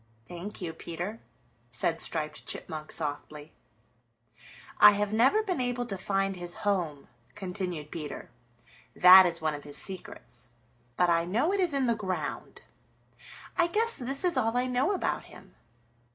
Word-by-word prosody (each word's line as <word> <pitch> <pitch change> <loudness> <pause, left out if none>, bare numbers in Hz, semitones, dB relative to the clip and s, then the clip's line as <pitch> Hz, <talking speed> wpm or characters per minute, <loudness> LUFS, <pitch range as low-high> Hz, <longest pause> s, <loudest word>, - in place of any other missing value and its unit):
"Thank 180 +3 -8
you, 165 -2 -4
Peter," 175 +7 -6 0.5
said 160 +7 0
Striped 155 -2 -3
Chipmunk 155 -1 -4
softly. 150 0 -2 1.3
"I 210 0 +9
never 230 - +3
have 435 - 0
been 365 -9 -1
able 245 -1 -2
to 200 - -4
find 195 0 -1
his 175 -1 -4
home," 170 -8 -1 0.3
continued 180 -6 -4
Peter. 155 -3 -7 0.6
"That 185 +1 +9
is 170 -1 -3
one 155 -1 0
of 145 -1 -7
his 145 -1 -2
secrets. 190 -8 -6 0.5
But 180 -1 +3
I 170 0 +2
know 240 - +1
it 400 - 0
is 360 -3 +2
in 275 -2 +1
the 235 - +2
ground. 185 -8 -5 0.9
I 345 -1 +3
guess 450 +6 +1
this 270 +4 -3
is 355 -2 +2
all 225 +2 +1
I 250 - +1
know 255 +7 +1
about 385 - -2
him. - - -15
190 Hz, 150 wpm, -28 LUFS, 165-245 Hz, 1.3 s, I